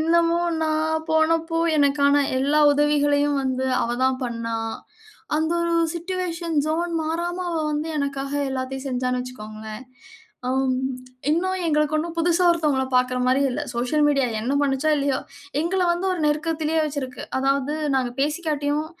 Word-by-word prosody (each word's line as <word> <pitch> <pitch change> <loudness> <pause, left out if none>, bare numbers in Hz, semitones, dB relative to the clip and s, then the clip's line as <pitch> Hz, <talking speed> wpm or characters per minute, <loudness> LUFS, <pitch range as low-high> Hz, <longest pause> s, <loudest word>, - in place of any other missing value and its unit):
என்னமோ 335 +1 +3 0.2
நான் 315 +1 0
போனப்போ 330 +1 +2 0.2
எனக்கான 285 0 +4 0.2
எல்லா 295 +3 +3
உதவிகளையும் 290 0 +2
வந்து 260 0 -1 0.2
அவ 235 - -1
தான் 260 0 +1
பண்னா. 230 -1 -3 0.8
அந்த 320 +2 +1
ஒரு 335 0 +1 0.2
சிட்யூவேஷன் 340 -2 -3
ஜோன் 340 +2 0
மாறாம 345 +3 -2
அவ - - -1 0.2
வந்து 300 +2 -2
எனக்காக 275 -1 -3 0.2
எல்லாத்தையும் 265 +1 -4
செஞ்சான்னு 250 -1 -1
வச்சுக்கோங்களேன். 215 -2 -8 0.6
ஆ - - 0 0.8
இன்னும் 375 +4 0
எங்களுக்கு 300 -1 +1
ஒண்ணும் 335 +2 -2
புதிசா 340 +2 +2
ஒருத்தவங்கள 300 -6 +1
பார்க்குற 250 0 +2
மாரி 260 +2 +3
இல்ல. 245 - -3
சோசியல் 250 +5 +1
மீடியா 275 -3 +2
என்ன 250 +5 -1
பண்ணுச்சோ 285 +2 +1
இல்லையோ 280 -1 0 0.4
எங்கள 365 +4 0
வந்து 355 +2 -2
ஒரு 350 - -3
நெருக்கத்திலேயே 315 +1 0
வச்சுருக்கு. 275 -4 -4 0.2
அதாவது 275 +2 +1 0.2
நாங்க 255 -2 +1
பேசிக்காட்டியும் 300 0 -1
295 Hz, 135 wpm, -23 LUFS, 265-325 Hz, 0.8 s, எனக்கான